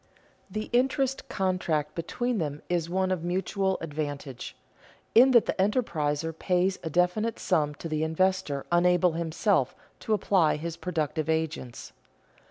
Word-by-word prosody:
The 215 0 -5
interest 265 +1 +1
contract 170 -6 -1
between 240 +8 -2
them 150 -2 -3
is 170 -2 0
one 185 +1 0
of 180 -3 -1
mutual 190 +2 0
advantage, 145 -4 -5 0.6
in 250 +4 +8
that 240 -3 +5
the - - 0
enterpriser 165 - 0
pays 180 +3 0
a 160 - -4
definite 180 +7 +1
sum 150 -5 0
to 165 - -7
the 155 -1 -1
investor 160 -3 0
unable 180 +1 +4
himself 165 - 0 0.2
to 220 - -1
apply 185 -5 +2
his 165 +2 -5
productive 160 -3 -2
agents. 160 -6 -2
175 Hz, 135 wpm, -27 LUFS, 155-190 Hz, 0.6 s, in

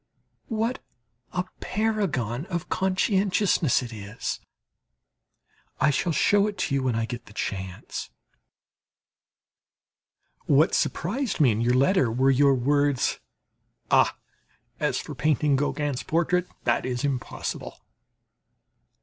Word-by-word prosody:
What 230 +3 -1 0.5
a 180 - -1 0.2
paragon 185 - -1
of 170 -2 -4
conscientiousness 190 - +2
it 120 -2 -7
is! 105 +1 -5 1.4
I 150 - +4
shall 170 +5 0
show 205 +5 +3
it 205 -2 -5
to 145 - -1
you 140 - +2
when 130 -3 0
I 115 0 0
get 120 0 -7
the 100 - -14
chance. 95 -3 -5 2.4
What 150 +5 +4
surprised 230 +7 -1
me 135 -6 +5
in 110 +1 -1
your 120 +1 +2
letter 135 - +3
were 130 +4 +3
your 140 +1 +4
words: 145 +1 +1 0.7
"Ah, - - +4 0.6
as - - 0
for - - -5
painting 150 -1 +2
Gauguin's 145 -1 -1
portrait 175 +2 +1 0.2
that - - +1
is 125 -1 -2
impossible!" 135 -4 -3
145 Hz, 115 wpm, -26 LUFS, 125-185 Hz, 2.4 s, me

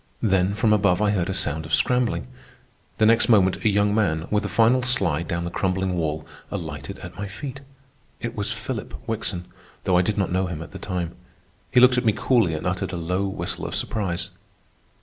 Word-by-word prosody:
Then 95 -2 +2
from 105 +1 +3
above, 100 -3 +3
I 105 -1 +2
heard 95 -3 0
a - - -1
sound 80 -2 0
of 80 0 +2
scrambling. 120 - +1 0.7
The 110 - +4
next 115 +3 +5
moment 95 -5 +4
a 110 - +4
young 105 0 +2
man, 85 -7 +1
with 105 0 +2
a - - -3
final 120 +3 +4
slide 90 - +2
down 85 0 -2
the 85 - -4
crumbling 95 0 0
wall, 80 -2 -2 0.2
alighted - - -6
at - - -9
my 100 - -3
feet. 135 +7 -7 0.6
It 120 0 -4
was 105 -1 -2
Philip 120 -6 -5
Wickson, 105 -5 -2 0.4
though 90 -2 +3
I - - +5
did 105 +3 -1
not 95 -3 0
know 95 +1 +1
him 85 -2 -5
at - - -12
the - - -8
time. 90 -4 -3 0.6
He 125 - +4
looked 125 0 +6
at 125 - -4
me 110 - +4
coolly 115 -11 +2
and 75 - -5
uttered 90 +1 -2
a - - -2
low 90 +4 -1
whistle 95 - -4
of - - -4
surprise. 95 -6 -2
95 Hz, 210 wpm, -24 LUFS, 85-110 Hz, 0.7 s, looked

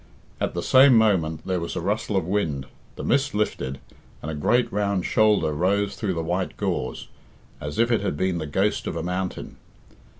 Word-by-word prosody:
At - - -2
the 85 - -2
same 130 -1 +6
moment 85 -8 +2
there 95 -1 0
was 85 0 -5
a - - -1
rustle 100 +2 -1
of 95 - 0
wind, 80 -8 -1 0.3
the - - -7
mist 140 -2 +1
lifted, 70 -10 -2 0.4
and 80 - -3
a - - -4
great 120 +12 +1
round 100 -3 0
shoulder 105 -8 +3
rose 100 +6 0
through 95 -5 -2
the 80 - -2
white 90 +3 -2
gauze, - - -3 0.5
as 75 0 -6
if 115 +1 +3
it 115 - +2
had 95 -7 -2
been 95 -1 0
the 80 - -4
ghost 95 +8 0
of - - -3
a 80 - -3
mountain. 90 +1 -4
95 Hz, 195 wpm, -24 LUFS, 80-105 Hz, 0.5 s, same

